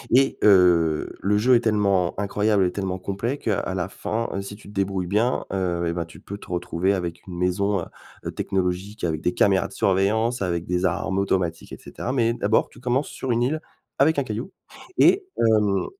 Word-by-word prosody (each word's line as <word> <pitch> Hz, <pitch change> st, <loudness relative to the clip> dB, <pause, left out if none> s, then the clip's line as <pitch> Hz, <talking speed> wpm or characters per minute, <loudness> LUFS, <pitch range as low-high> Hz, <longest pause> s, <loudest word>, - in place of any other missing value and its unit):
et 135 Hz, +1 st, +3 dB
heu, 90 Hz, -6 st, +4 dB
le 105 Hz, +1 st, +2 dB
jeu 125 Hz, +4 st, +4 dB
est 120 Hz, -, +5 dB
tellement 100 Hz, -6 st, +1 dB
incroyable 105 Hz, -1 st, +2 dB
et 90 Hz, -, 0 dB
tellement 95 Hz, -2 st, -3 dB
complet 100 Hz, +9 st, -3 dB
qu'à 100 Hz, -5 st, -2 dB
la 90 Hz, 0 st, -2 dB
fin, 115 Hz, +3 st, -3 dB
si 100 Hz, +1 st, -8 dB
tu 100 Hz, -, -14 dB
te 105 Hz, -, -13 dB
débrouilles 95 Hz, -2 st, -1 dB
bien, 110 Hz, +6 st, +1 dB
heu, 90 Hz, -2 st, -1 dB
eh 85 Hz, -, -1 dB
ben, 85 Hz, -1 st, -3 dB
tu 80 Hz, -, -14 dB
peux 100 Hz, -, -8 dB
te -, -, -13 dB
retrouver 90 Hz, +2 st, 0 dB
avec 85 Hz, -2 st, -5 dB
une 90 Hz, -2 st, -7 dB
maison, 95 Hz, +2 st, +1 dB
heu -, -, -5 dB, 0.4 s
heu, -, -, -3 dB
technologique 95 Hz, +3 st, -2 dB
avec 80 Hz, -2 st, -1 dB
des 90 Hz, -, 0 dB
caméras 95 Hz, -2 st, +3 dB
de -, -, -15 dB
surveillance, 110 Hz, +5 st, +1 dB
avec 85 Hz, -3 st, -1 dB
des 90 Hz, +1 st, 0 dB
armes 95 Hz, +2 st, 0 dB
automatiques 90 Hz, -4 st, -1 dB
et -, -, -6 dB
cetera 125 Hz, -, -5 dB
mais 115 Hz, -3 st, +2 dB
d'abord, 110 Hz, -2 st, +1 dB
tu -, -, -16 dB
commences 125 Hz, +3 st, 0 dB
sur 130 Hz, -, -6 dB
une 120 Hz, +1 st, +2 dB
île 155 Hz, +5 st, -1 dB, 0.4 s
avec 150 Hz, +3 st, +4 dB
un 140 Hz, -, +1 dB
caillou, 115 Hz, -, -5 dB, 0.5 s
et 385 Hz, 0 st, +5 dB
hem, 105 Hz, -3 st, +2 dB
100 Hz, 205 wpm, -24 LUFS, 90-110 Hz, 0.5 s, est